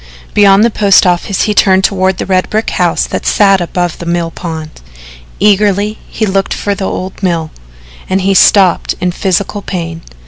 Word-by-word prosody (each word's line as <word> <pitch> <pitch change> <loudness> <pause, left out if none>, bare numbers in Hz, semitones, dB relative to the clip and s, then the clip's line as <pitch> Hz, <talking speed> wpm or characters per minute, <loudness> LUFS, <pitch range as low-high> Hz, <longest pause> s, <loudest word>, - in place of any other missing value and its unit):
Beyond 200 0 +5
the 235 - +2
post 200 -3 +3
office 180 +2 0
he 210 - 0
turned 190 -2 +3
toward 190 -2 +1
the - - -4
red 185 -1 0
brick 215 +1 -1
house 175 -2 0
that - - -5
sat 195 -2 +3
above 175 0 -3
the 170 - -7
mill 170 -1 -1
pond. 160 - -7 0.6
Eagerly 205 +1 +1
he 220 - -2
looked 195 -1 -1
for 205 - -2
the 200 -1 -4
old 185 +2 -6
mill, 170 -4 -1 0.6
and 190 +1 0
he 195 +1 +1
stopped 190 -2 +3
in 180 -1 -1
physical 195 +3 -2
pain. 165 -4 -5
190 Hz, 175 wpm, -11 LUFS, 175-200 Hz, 0.6 s, Beyond